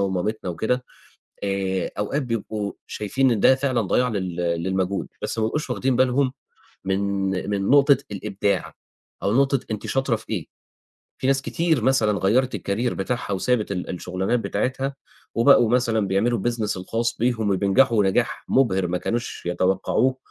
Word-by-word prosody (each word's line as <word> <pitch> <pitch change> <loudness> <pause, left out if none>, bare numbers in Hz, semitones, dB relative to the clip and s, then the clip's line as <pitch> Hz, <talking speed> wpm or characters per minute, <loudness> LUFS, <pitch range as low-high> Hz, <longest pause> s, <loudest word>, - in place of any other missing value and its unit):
ومامتنا 95 +1 -1
وكده، 125 +8 -1 0.6
آآ 95 -2 -1
أوقات 140 +8 -1
بيبقوا 110 -4 -3
شايفين 130 +5 0
إن 110 - +1
ده 130 - +6
فعلًا 130 -3 0
ضَياع 125 +5 +1
لل 95 -5 -3
للمجهود، 90 +3 -1
بس - - -3
ما 110 - +1
بيبقوش 150 +6 -2
واخدين 130 +1 0
بالهم 130 +1 +2 0.5
من 95 0 0 0.5
من 100 -1 -1
نقطة 140 0 +6 0.2
الإبداع 100 0 -2 0.5
أو 100 - +1
نقطة 135 0 +3
أنتِ 105 - -4
شاطرة 135 -3 +1
في 110 - -14
إيه. 90 -7 -2 0.7
في - - -1
ناس 135 0 +2
كتير 165 -6 0
مثلًا 110 -6 +3
غيّرت 130 +6 +2
الcareer 115 +5 -1
بتاعها، 105 +2 -3
وسابت 105 +1 0
ال 90 - -4
الشُغلانات 95 +6 -1
بتاعتها، 135 +4 -2 0.4
وبقوا 120 -1 +5
مثلًا 115 -4 +2
بيعملوا 115 +5 +1
الbusiness 115 -2 -1
الخاص 115 +5 -2
بيهم، 115 -3 +1
وبينجحوا 100 +3 +3
نجاح 95 - 0
مُبهر، 95 -9 +2
ما 90 +1 -1
كانوش 120 -4 -3
يتوقعوه 95 +8 +1
110 Hz, 150 wpm, -23 LUFS, 95-125 Hz, 0.7 s, ده